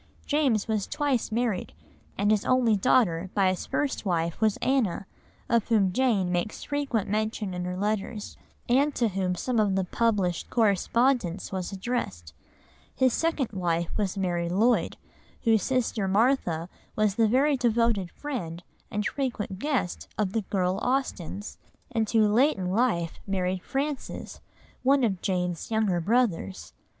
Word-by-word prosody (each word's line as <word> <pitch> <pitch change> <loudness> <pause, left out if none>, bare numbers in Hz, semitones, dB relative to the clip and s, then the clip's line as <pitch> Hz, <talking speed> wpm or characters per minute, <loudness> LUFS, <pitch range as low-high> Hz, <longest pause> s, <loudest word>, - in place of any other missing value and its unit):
James 270 -9 +1
was 215 -3 -1
twice 280 -7 0
married, 225 -4 -1 0.4
and 205 +1 +2
his 215 -2 +2
only 250 -4 +3
daughter 190 -5 +2
by 195 -2 +4
his 185 - -3
first 290 -2 -1
wife 170 -3 -1
was 215 -2 +3
Anna, 245 -8 0 0.4
of 230 -2 +2
whom 200 -5 +3
Jane 210 -7 +2
makes 175 +4 -2
frequent 280 -7 -1
mention 215 -1 -1
in 180 0 -3
her 180 0 -3
letters, 210 +1 -2 0.3
and 275 +4 +3
to 235 -2 +2
whom 185 -2 -1
some 240 +5 -1
of 205 -3 +2
the 190 - +1
published 190 -4 0
correspondence 225 -2 +1
was 190 -1 -3
addressed. 190 - -4 0.6
His 260 -2 +3
second 325 -6 0
wife 170 -4 -1
was 200 -3 -1
Mary 175 -3 -1
Lloyd, 220 +7 +2 0.5
whose 225 -4 +4
sister 240 -6 0
Martha 195 -6 +2 0.3
was 215 -2 +2
the 225 +2 +3
very 275 +6 +3
devoted 230 -6 +1
friend, 180 - -5 0.3
and 210 0 -2
frequent 225 -9 -3
guest, 270 - -1
of 205 -3 0
the 225 - +1
girl 185 -2 -1
Austens, 215 -7 -2 0.3
and 225 -3 0
who 220 -2 +4
late 250 +8 +3
in 180 -1 -2
life 190 -7 0
married 185 -1 -1
Francis, 275 +5 -4 0.4
one 270 +1 +3
of 195 -6 0
Jane's 180 -3 -2
younger 215 -5 +1
brothers. 165 - 0
210 Hz, 145 wpm, -27 LUFS, 185-245 Hz, 0.6 s, by